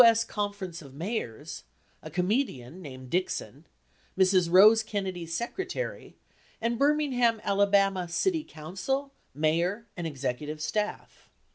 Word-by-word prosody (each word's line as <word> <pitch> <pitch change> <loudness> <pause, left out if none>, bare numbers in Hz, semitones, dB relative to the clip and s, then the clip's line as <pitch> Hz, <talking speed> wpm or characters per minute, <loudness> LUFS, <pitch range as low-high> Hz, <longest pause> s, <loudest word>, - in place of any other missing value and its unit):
S. 230 -1 +6
Conference 200 -6 -4
of 135 -3 -13
Mayors, 155 - -4 0.4
a 155 - -8
comedian 180 - -1
named 130 -5 -9
Dixon, 165 - -2 0.5
Mrs. 185 -2 +4
Rose 215 +5 +8
Kennedy's 190 -6 -4
secretary, 380 - -4 0.4
and 230 +1 -1
Birmingham, 275 -6 +3
Ala. 195 -2 +3
city 325 - +1
council, 195 - -4 0.2
mayor, 170 +9 +1
and 175 -2 -3
executive 145 +1 -3
staff. 210 +7 -3
190 Hz, 110 wpm, -28 LUFS, 160-225 Hz, 0.5 s, Rose